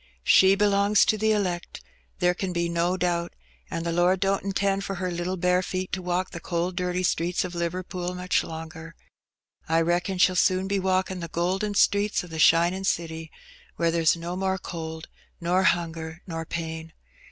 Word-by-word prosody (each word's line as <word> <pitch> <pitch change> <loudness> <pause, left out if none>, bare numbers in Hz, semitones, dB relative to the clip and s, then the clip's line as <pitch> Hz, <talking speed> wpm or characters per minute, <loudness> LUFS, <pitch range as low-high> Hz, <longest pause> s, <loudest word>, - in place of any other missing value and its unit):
''She 190 +1 +6
belongs 205 0 +4
to - - +2
the 220 +1 +1
elect, 185 -5 -2 0.3
there 180 -1 +2
ken 185 0 -3
be 170 0 0
no 170 +2 0
doubt, 175 -1 -1 0.4
an^ 165 - -3
the 170 - -1
Lord 175 +2 +2
don't 195 0 +1
intend 195 0 0
for 195 - -4
her 185 0 -3
little 175 +2 -3
bare 180 +1 +2
feet 185 0 -4
to 185 - -2
walk 180 +1 -1
the - - -6
cold, 175 +1 -2
dirty 180 0 -1
streets 175 0 0
o' - - -4
Liverpool 180 +1 -3
much 180 0 0
longer. 160 0 -8 0.7
I 165 0 +3
reckon 175 +3 0
she'll 185 0 +4
soon 185 +1 +2
be 200 0 0
walking 185 0 0
the 170 - -5
golden 185 +5 -1
streets 205 0 +2
o' - - -9
the 160 -1 -7
shinin' 170 +4 +4
city, 160 -2 -2 0.5
where 170 -1 +1
there's 165 0 +3
no 170 +1 -5
more 190 0 0
cold, 160 -3 -7 0.3
nor 175 +2 +1
hunger, 165 -2 -1
nor 165 -2 -5
pain. 160 -1 -5
180 Hz, 180 wpm, -26 LUFS, 170-190 Hz, 0.7 s, She